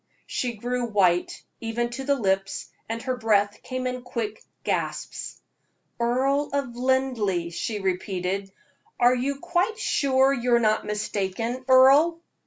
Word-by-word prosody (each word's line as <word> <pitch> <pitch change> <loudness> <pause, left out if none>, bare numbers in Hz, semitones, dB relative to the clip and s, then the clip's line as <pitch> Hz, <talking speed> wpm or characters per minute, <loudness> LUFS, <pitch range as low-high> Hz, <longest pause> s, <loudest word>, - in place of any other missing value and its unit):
She 245 -2 -2
grew 245 +3 -2
white, 185 -5 +1 0.2
even 235 +1 -2
to 265 +3 -5
the 280 +1 +2
lips, 195 -5 -1 0.2
and 230 0 -3
her 255 -1 -1
breath 205 -4 +1
came 255 0 -4
in 250 0 -2
quick 230 -3 -4 0.2
gasps. - - -3 0.6
"Earl 265 +5 +1
of 275 -4 -2
Linleigh?" 245 -9 0
she 210 +5 -3
repeated. 190 0 -2 0.5
"Are 245 +1 +6
you 260 +3 -1
quite 350 +6 0
sure 270 - +3
you 245 -2 +2
are - - +4
not 215 -2 +1
mistaken, 210 +4 -2
Earle?" 275 +6 +6
240 Hz, 135 wpm, -25 LUFS, 210-260 Hz, 0.6 s, Are